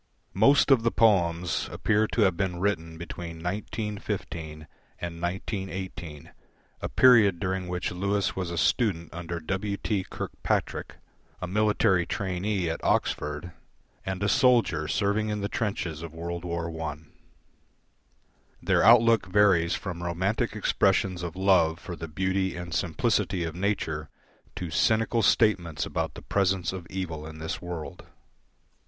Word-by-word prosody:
Most 140 Hz, +8 st, +5 dB
of 130 Hz, -4 st, +6 dB
the 115 Hz, -, +2 dB
poems 90 Hz, -7 st, +2 dB
appear 110 Hz, 0 st, +1 dB
to 115 Hz, -, -1 dB
have 95 Hz, -4 st, +4 dB
been 90 Hz, -2 st, -2 dB
written 85 Hz, -4 st, -1 dB
between 85 Hz, 0 st, -7 dB
1915 85 Hz, -4 st, -4 dB, 0.3 s
and 85 Hz, -1 st, -6 dB
1918, 90 Hz, -4 st, -5 dB, 0.5 s
a -, -, -3 dB
period 110 Hz, -8 st, +6 dB
during 95 Hz, -1 st, -2 dB
which 90 Hz, 0 st, -2 dB
Lewis 100 Hz, +2 st, -1 dB
was 95 Hz, -2 st, -3 dB
a 85 Hz, -, -4 dB
student 85 Hz, -1 st, +1 dB
under 85 Hz, 0 st, -5 dB
W. 95 Hz, +5 st, -2 dB
T. 100 Hz, -3 st, -1 dB
Kirkpatrick, -, -, -3 dB, 0.4 s
a -, -, -3 dB
military 100 Hz, -2 st, +2 dB
trainee 95 Hz, -1 st, -1 dB
at 80 Hz, -, -3 dB
Oxford, 75 Hz, +4 st, 0 dB, 0.5 s
and 95 Hz, 0 st, -3 dB
a -, -, +2 dB
soldier 115 Hz, -, +3 dB
serving 105 Hz, +1 st, 0 dB
in 105 Hz, -1 st, -2 dB
the 100 Hz, -, -1 dB
trenches 90 Hz, -8 st, -3 dB
of 80 Hz, -1 st, -8 dB
World 85 Hz, +1 st, -5 dB
War 85 Hz, -1 st, -3 dB
I. 75 Hz, -3 st, -3 dB, 1.6 s
Their -, -, +2 dB
outlook 115 Hz, -1 st, +6 dB
varies 95 Hz, -4 st, +4 dB
from 90 Hz, -4 st, -5 dB
Romantic 95 Hz, +7 st, -1 dB
expressions 95 Hz, -3 st, +1 dB
of 85 Hz, -1 st, -5 dB
love 90 Hz, -4 st, +3 dB
for 85 Hz, -, -7 dB
the 80 Hz, -, -7 dB
beauty 95 Hz, +3 st, -1 dB
and 90 Hz, -1 st, -6 dB
simplicity 95 Hz, +1 st, 0 dB
of 80 Hz, -1 st, -3 dB
nature 85 Hz, -6 st, -2 dB, 0.5 s
to 90 Hz, -3 st, -5 dB
cynical 115 Hz, +6 st, +2 dB
statements 90 Hz, -8 st, +2 dB
about -, -, -3 dB
the -, -, -10 dB
presence 95 Hz, -2 st, 0 dB
of 90 Hz, -2 st, -7 dB
evil 80 Hz, -5 st, -4 dB
in 80 Hz, 0 st, -9 dB
this 80 Hz, 0 st, -4 dB
world. 85 Hz, -3 st, -7 dB
95 Hz, 140 wpm, -27 LUFS, 85-100 Hz, 1.6 s, of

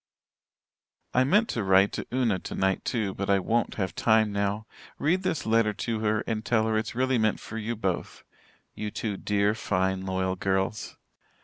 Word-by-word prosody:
"I 130 Hz, -, +4 dB
meant 210 Hz, -, +3 dB
to 115 Hz, -, -1 dB
write 95 Hz, +1 st, +4 dB
to -, -, -5 dB
Una 120 Hz, -7 st, +1 dB
tonight, 95 Hz, +1 st, -1 dB
too, 105 Hz, -5 st, -1 dB
but 100 Hz, +1 st, -4 dB
I 100 Hz, -, +5 dB
won't 115 Hz, +5 st, 0 dB
have 95 Hz, -3 st, -2 dB
time 110 Hz, -2 st, +3 dB
now. 100 Hz, +1 st, -1 dB, 0.3 s
Read 175 Hz, +6 st, +1 dB
this 185 Hz, -4 st, -2 dB
letter 110 Hz, -1 st, +3 dB
to 110 Hz, +2 st, -3 dB
her 110 Hz, 0 st, +1 dB
and 110 Hz, -1 st, -2 dB
tell 110 Hz, -1 st, +2 dB
her 110 Hz, 0 st, 0 dB
it's 110 Hz, +2 st, -2 dB
really 130 Hz, 0 st, +2 dB
meant 110 Hz, -1 st, +1 dB
for 115 Hz, -, -7 dB
you 115 Hz, +2 st, -3 dB
both 95 Hz, -5 st, -3 dB, 0.5 s
you 105 Hz, -, -4 dB
two 105 Hz, 0 st, -3 dB
dear, 100 Hz, +1 st, +1 dB
fine 95 Hz, -3 st, -1 dB
loyal 95 Hz, 0 st, -1 dB
girls. 95 Hz, +2 st, -1 dB
105 Hz, 180 wpm, -27 LUFS, 95-115 Hz, 0.5 s, I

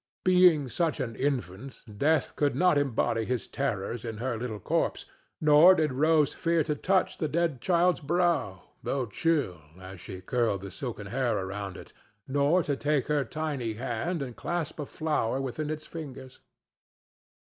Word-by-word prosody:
Being 180 Hz, -6 st, +5 dB
such 165 Hz, +4 st, -1 dB
an 115 Hz, -2 st, -3 dB
infant, 130 Hz, -2 st, -3 dB, 0.2 s
Death 155 Hz, +2 st, +2 dB
could 145 Hz, -1 st, +1 dB
not 180 Hz, -3 st, +4 dB
embody 120 Hz, -5 st, +1 dB
his 125 Hz, +1 st, -2 dB
terrors 115 Hz, -4 st, -3 dB
in 115 Hz, -2 st, -5 dB
her 120 Hz, +2 st, -2 dB
little 110 Hz, -2 st, -4 dB
corpse; -, -, -1 dB, 0.3 s
nor 155 Hz, +4 st, +7 dB
did 155 Hz, -5 st, +1 dB
Rose 150 Hz, +1 st, +3 dB
fear 165 Hz, -1 st, +1 dB
to 150 Hz, -, -1 dB
touch 185 Hz, +5 st, 0 dB
the 155 Hz, -, 0 dB
dead 160 Hz, -5 st, 0 dB
child's 180 Hz, +3 st, +3 dB
brow, 150 Hz, -, 0 dB, 0.2 s
though 135 Hz, -2 st, -1 dB
chill, 120 Hz, -, 0 dB, 0.2 s
as 95 Hz, -1 st, -10 dB
she 95 Hz, -2 st, -8 dB
curled 110 Hz, 0 st, 0 dB
the 100 Hz, -1 st, -7 dB
silken 110 Hz, 0 st, -6 dB
hair 120 Hz, +1 st, 0 dB
around 95 Hz, -1 st, -5 dB
it, -, -, -12 dB, 0.3 s
nor 145 Hz, +6 st, +2 dB
to 145 Hz, -2 st, -1 dB
take 145 Hz, -1 st, 0 dB
her 150 Hz, -2 st, +2 dB
tiny 140 Hz, -4 st, -3 dB
hand 125 Hz, +8 st, -3 dB
and 125 Hz, -3 st, -7 dB
clasp 170 Hz, -3 st, -3 dB
a 145 Hz, -, -4 dB
flower 150 Hz, -6 st, -1 dB
within 135 Hz, +3 st, -3 dB
its 155 Hz, 0 st, -4 dB
fingers. 135 Hz, -5 st, -9 dB
140 Hz, 160 wpm, -28 LUFS, 115-155 Hz, 0.3 s, nor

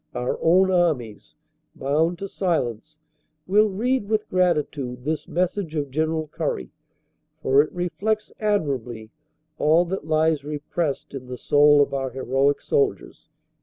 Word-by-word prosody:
Our 125 Hz, -, -2 dB
own 185 Hz, +3 st, +4 dB
Armies, 150 Hz, -, -1 dB, 0.4 s
bound 160 Hz, +5 st, 0 dB
to 195 Hz, +2 st, -5 dB
silence, 155 Hz, -, -2 dB, 0.5 s
will 210 Hz, +3 st, +4 dB
read 220 Hz, +2 st, -1 dB
with 215 Hz, -1 st, 0 dB
gratitude 150 Hz, -8 st, 0 dB
this 155 Hz, +2 st, -3 dB
message 180 Hz, -1 st, -2 dB
of 145 Hz, -3 st, -2 dB
General 160 Hz, +2 st, -1 dB
Currie, 145 Hz, -, -3 dB, 0.7 s
for 135 Hz, +2 st, +5 dB
it 150 Hz, -, -3 dB
reflects 205 Hz, +5 st, -2 dB
admir 200 Hz, -11 st, +1 dB
ably 110 Hz, -2 st, -10 dB, 0.5 s
all 160 Hz, +4 st, +4 dB
that 175 Hz, -2 st, -5 dB
lies 155 Hz, -2 st, +2 dB
repressed 150 Hz, 0 st, -3 dB
in 130 Hz, -2 st, -7 dB
the 125 Hz, 0 st, -6 dB
soul 145 Hz, +2 st, +5 dB
of -, -, -5 dB
our 135 Hz, -1 st, -1 dB
heroic 135 Hz, +2 st, 0 dB
soldiers." 425 Hz, -3 st, -1 dB
155 Hz, 135 wpm, -23 LUFS, 135-180 Hz, 0.7 s, for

